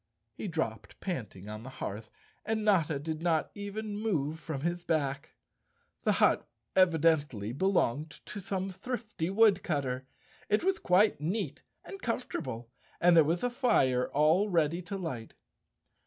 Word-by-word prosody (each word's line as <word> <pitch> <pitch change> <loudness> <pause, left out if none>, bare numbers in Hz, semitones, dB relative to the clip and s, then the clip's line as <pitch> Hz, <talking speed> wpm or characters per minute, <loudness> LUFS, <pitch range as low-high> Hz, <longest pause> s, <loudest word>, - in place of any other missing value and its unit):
He - - -5
dropped 115 - -3
panting 110 - -5
on 105 0 -6
the 125 - -8
hearth, 110 -4 -6 0.3
and 220 0 -1
Notta 165 -8 +3
did 155 +2 -4
not 165 -2 +1
even 205 +1 -5
move 160 -8 -1
from 155 -3 -5
his 175 +3 -1
back. 145 -5 -1 0.7
The - - +4
hut - - +3 0.3
evidently 160 - +3
belonged 155 -2 +1 0.2
to 210 - -6
some 190 0 -2
thrifty 210 -3 -4
woodcutter. 155 - +2 0.4
It 210 +7 +2
was 385 +1 +2
quite 185 -3 +3
neat 180 +9 -2 0.2
and 390 - -9
com¬ 240 +1 -1
fortable 120 -2 -5 0.3
and 175 0 +6
there 165 - +8
was 165 +7 0
a 245 - +2
fire 135 - +2
all 160 +8 +3
ready 170 -1 +2
to 185 +3 -5
light. 130 -12 -5
165 Hz, 145 wpm, -31 LUFS, 140-200 Hz, 0.7 s, there